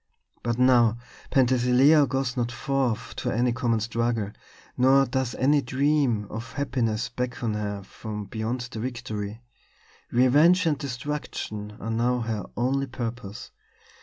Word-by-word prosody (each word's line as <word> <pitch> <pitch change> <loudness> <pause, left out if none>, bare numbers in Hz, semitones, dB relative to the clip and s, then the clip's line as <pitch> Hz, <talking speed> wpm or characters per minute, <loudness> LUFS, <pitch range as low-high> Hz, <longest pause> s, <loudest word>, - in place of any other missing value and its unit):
But 120 -1 -1
now 120 -3 +4 0.3
Penthesilea 130 +3 +4
goes 135 -1 -1
not 120 -2 -1
forth 130 -2 -1
to - - -2
any 120 +2 +1
common 120 -2 +1
struggle, 115 -2 -1 0.4
nor 135 +2 +5
does 130 -1 -2
any 145 +3 +3
dream 135 -4 +1
of 115 +2 -6
happiness 125 -4 -1
beckon 125 -2 -3
her 105 -1 -3
from 105 +1 -7
beyond 110 +5 -3
the 120 -2 -7
victory. 115 -3 -5 0.7
Revenge 150 +9 +5
and 150 -4 +1
destruction 125 -6 -5
are 115 - -4
now 120 +2 +1
her 110 -4 -3
only 135 +3 +1
purpose. 120 -4 -6
120 Hz, 130 wpm, -26 LUFS, 115-130 Hz, 0.7 s, nor